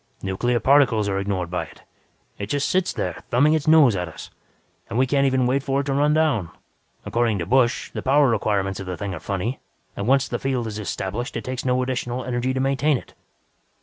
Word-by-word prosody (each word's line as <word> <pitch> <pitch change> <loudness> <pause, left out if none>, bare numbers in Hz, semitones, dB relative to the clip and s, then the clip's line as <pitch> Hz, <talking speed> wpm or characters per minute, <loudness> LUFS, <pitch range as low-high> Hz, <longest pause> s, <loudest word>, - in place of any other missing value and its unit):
Nuclear 120 +6 0
particles 125 -4 +4
are 95 -1 0
ignored 95 -3 -2
by 90 - -2
it; - - -17 0.6
it 100 - -4
just 140 +5 0
sits 185 -1 +1
there - - -4
thumbing 145 +6 +4
its 155 -2 -1
nose 155 -8 +6
at 90 -1 -2
us. 80 - -10 0.6
And 115 - -3
we 130 - +4
can't 140 +1 +2
even 130 -1 +2
wait 130 +3 +1
for 135 0 0
it - - -5
to 135 0 -2
run 145 +2 +2
down. 150 - +1 0.6
According 115 -3 +1
to 85 - -3
Busch, 125 +1 +1
the - - -5
power 140 +2 +4
requirements 100 -4 0
of 95 - -7
the 90 -1 -4
thing 100 -2 -4
are 85 - -6
funny 100 +9 -3 0.4
and 100 - -4
once 135 +1 +3
the - - -3
field 130 -3 -1
is 110 -1 -5
established, 105 +3 -4
it - - -5
takes 130 0 -5
no 125 0 +2
additional 125 -1 -3
energy 125 +1 -1
to 130 - -2
maintain 135 +2 +2
it. - - -12
125 Hz, 215 wpm, -23 LUFS, 100-135 Hz, 0.6 s, nose